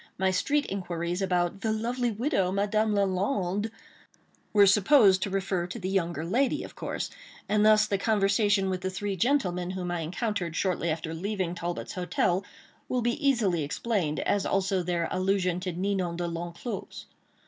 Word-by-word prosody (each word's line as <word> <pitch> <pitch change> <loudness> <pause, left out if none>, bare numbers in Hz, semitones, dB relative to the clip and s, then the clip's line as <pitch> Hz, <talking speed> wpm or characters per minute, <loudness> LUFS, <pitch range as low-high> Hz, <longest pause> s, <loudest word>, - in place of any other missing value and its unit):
My 190 0 +2
street 285 +10 +1
inquiries 175 -1 -3
about 180 0 0
"the 220 - 0
lovely 240 +3 -1
widow, 220 - 0
Madame 210 +2 +1
Lalande," 200 +1 0 0.8
were 205 -1 +6
supposed 200 -1 +5
to - - -1
refer 190 -2 -1
to 185 - -6
the 190 -3 -3
younger 170 -4 -1
lady, 260 - +1
of - - -10
course, - - -4 0.4
and 210 0 +2
thus 215 0 +6
the 200 -2 -1
conversation 200 -1 +2
with 185 -1 -3
the 185 - -1
three 200 +1 -3
gentlemen 180 -6 +1
whom 185 -1 -3
I 175 - -1
encountered 180 +1 -2
shortly 180 -2 0
after 160 0 -3
leaving 185 0 -2
Talbot's 175 0 -4
hotel 180 +1 0 0.5
will 250 -2 0
be 240 +6 -1
easily 205 - +2
explained, 160 0 -1
as 200 -1 +1
also 195 -1 +1
their 175 -1 -1
allusion 185 -1 +1
to 180 0 -3
Ninon 185 -1 -1
De 175 0 -2
L'Enclos. 175 +5 -6
190 Hz, 160 wpm, -28 LUFS, 175-210 Hz, 0.8 s, were